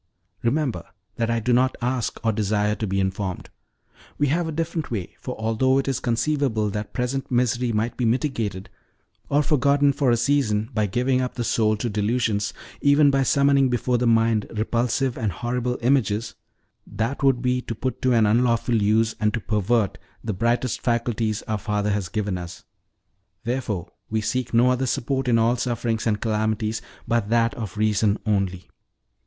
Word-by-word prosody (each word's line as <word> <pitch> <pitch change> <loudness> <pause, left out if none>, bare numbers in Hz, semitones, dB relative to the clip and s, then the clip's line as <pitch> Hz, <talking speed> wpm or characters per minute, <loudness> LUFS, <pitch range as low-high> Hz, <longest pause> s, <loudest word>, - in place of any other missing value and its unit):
Remember 120 - 0 0.3
that 115 -1 0
I 115 0 +1
do 120 +2 +1
not 130 +2 +3
ask 125 -1 -2
or 115 - +4
desire 105 0 0
to 110 0 -3
be 95 +1 -1
informed. 95 -1 -3 0.7
We 145 -1 +1
have 165 +3 +1
a - - -3
different 160 0 -3
way; 100 -7 -4
for 125 - -5
although 115 +4 +2
it 135 - 0
is 135 -3 0
conceivable 120 -3 0
that 105 +1 -4
present 130 +2 -2
misery 125 -1 +1
might 110 +2 -1
be 125 - 0
mitigated, 115 -6 -1 0.6
or 145 +1 +3
forgotten 140 -1 +3
for 135 -1 +1
a 120 - +3
season, 115 -4 +1
by 105 -1 +1
giving 125 +5 +1
up 125 - -3
the 120 - -2
soul 110 -2 +1
to 120 - -2
delusions, 105 -1 0 0.3
even 145 0 +5
by 135 0 +2
summoning 140 0 +3
before 125 0 0
the 125 - +1
mind 115 -2 +3
repulsive 120 +4 0
and 110 -4 0
horrible 125 +5 -2
images, 115 -4 +1 0.5
that 115 +8 -3
would 135 -3 +2
be 125 0 +1
to 115 - -5
put 130 +3 -4
to 130 - +2
an 115 -3 +4
unlawful 115 +1 +2
use, 110 +2 +2
and 105 0 +1
to - - -2
pervert, 105 +1 0 0.2
the 110 - -2
brightest 120 +4 0
faculties 115 -3 -1
our 110 -1 -2
Father 105 0 -1
has 100 -4 -2
given 100 -2 -2
us: 85 -1 -9 0.8
therefore 115 -7 -3 0.2
we 110 - 0
seek 125 +3 -2
no 120 +2 +4
other 130 +1 0
support 130 +2 -1
in 120 -2 +4
all 115 +2 +2
sufferings 115 -2 -1
and 105 -2 0
calamities 110 0 -1 0.3
but 115 -3 0
that 115 0 +2
of 110 -3 -6
reason 105 -1 +2
only. 95 -4 -1
115 Hz, 175 wpm, -23 LUFS, 105-125 Hz, 0.8 s, even